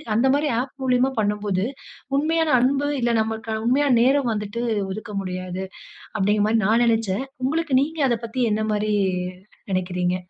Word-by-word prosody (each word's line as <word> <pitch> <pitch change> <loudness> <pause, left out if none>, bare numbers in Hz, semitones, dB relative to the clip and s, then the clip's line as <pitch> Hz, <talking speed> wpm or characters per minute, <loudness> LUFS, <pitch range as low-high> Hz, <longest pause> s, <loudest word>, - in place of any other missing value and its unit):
அந்த 235 +5 +3
மாரி 290 +1 +1
ஆப் 255 +1 -4
மூலியமா 255 +1 +2
பண்ணும்போது 205 -2 0 0.5
உண்மையான 320 +1 +1
அன்பு, 275 +3 +2
இல்ல 240 0 +1
நம்மள்கான 220 0 -3
உண்மையான 270 0 +3
நேரம் 265 -1 +3
வந்துட்டு 210 +2 -4 0.3
ஒதுக்க 210 +2 -6
முடியாது. 185 0 -5 0.6
அப்டிங்க 205 +1 +2
மாரி 225 0 +3
நான் 225 +3 +3
நெனச்சேன். 225 0 +1 0.2
உங்களுக்கு 310 0 0
நீங்க 315 +2 -3
அதப் 230 0 -1
பத்தி 230 +3 -4
என்ன 215 +1 0
மாரி 210 0 0 0.8
நெனைக்கிறீங்க? 180 -1 0
225 Hz, 145 wpm, -23 LUFS, 205-265 Hz, 0.8 s, அந்த